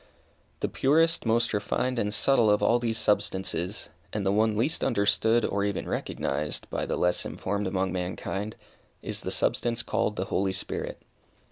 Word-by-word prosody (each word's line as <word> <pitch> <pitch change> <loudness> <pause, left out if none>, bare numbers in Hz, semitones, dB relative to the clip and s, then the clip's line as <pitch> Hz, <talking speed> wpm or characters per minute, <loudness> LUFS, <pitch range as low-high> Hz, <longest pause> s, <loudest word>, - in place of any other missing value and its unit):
The - - +1
purest, 165 0 +2
most 115 +1 +2
refined 120 +5 0
and 105 -1 0
subtle 115 +1 +4
of 105 0 +3
all 120 +4 +4
these 115 -2 -1
substances, 95 -3 0 0.2
and 105 -2 -2
the 95 - +3
one 110 +1 +2
least 135 +9 +1
understood, 110 0 +3
or 100 0 0
even 100 -1 -2
recognized, 75 0 -2
by - - -2
the - - -1
less 90 0 +1
informed 100 +1 -3
among 95 0 0
mankind, 95 +3 -3 0.5
is - - -4
that - - -4
substance 120 0 +1
called 105 - 0
the 95 - -2
Holy 95 0 0
Spirit. 95 - -4
105 Hz, 160 wpm, -27 LUFS, 95-115 Hz, 0.5 s, subtle